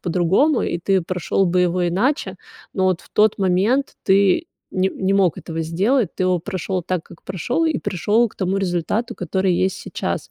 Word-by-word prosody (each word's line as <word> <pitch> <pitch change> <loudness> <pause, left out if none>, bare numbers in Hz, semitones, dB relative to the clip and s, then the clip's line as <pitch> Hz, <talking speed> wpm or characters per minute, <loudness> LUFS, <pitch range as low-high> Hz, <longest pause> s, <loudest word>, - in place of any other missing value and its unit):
по-другому, 185 - +2
и 170 - -2
ты 190 +1 +1
прошел 185 +2 0
бы 180 +1 +2
его 180 0 +1
иначе, 245 - 0 0.4
но 190 - 0
вот 185 -2 +1
в - - -20
тот 210 0 +3
момент 200 +9 +1
ты 200 - +3 0.3
не 185 0 +1
не 190 0 -1
мог 190 -5 +3
этого 165 0 -5
сделать. 195 +7 0
Ты - - -2
его 185 -1 +2
прошел 185 +1 -3
так, 175 -1 -2
как - - -16
прошел, 240 - -1
и 315 -4 +1
пришел 210 +6 +1
к - - -23
тому 190 +1 -1
результату, 195 +6 -1
который 185 +1 0
есть 185 +2 +1
сейчас. - - -4
190 Hz, 185 wpm, -21 LUFS, 180-210 Hz, 0.4 s, тот